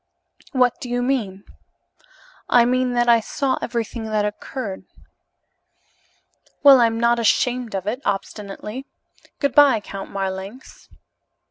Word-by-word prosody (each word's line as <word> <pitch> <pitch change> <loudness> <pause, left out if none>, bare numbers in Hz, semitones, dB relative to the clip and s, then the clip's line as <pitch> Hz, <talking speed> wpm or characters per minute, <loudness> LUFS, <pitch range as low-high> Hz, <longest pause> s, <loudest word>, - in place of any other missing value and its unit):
"What 250 -3 +1
do 250 - -6
you 245 0 -1
mean?" 215 -7 -2 1.1
"I 240 -1 +5
mean 255 0 +1
that 240 0 +1
I 235 -1 +6
saw 260 +4 -2
everything 230 -1 -4
that 215 -1 0
occurred." 210 0 -6 1.8
"Well, 275 -3 +8
I'm 230 -1 +2
not 235 0 +2
ashamed 240 0 +1
of 190 -1 -3
it," 235 +6 -3
obstinately. 210 +5 -5 0.5
"Good 280 -3 0
bye, 280 -5 +6
Count 195 -1 -8
Marlanx." 195 +5 -6
235 Hz, 120 wpm, -21 LUFS, 210-255 Hz, 1.8 s, Well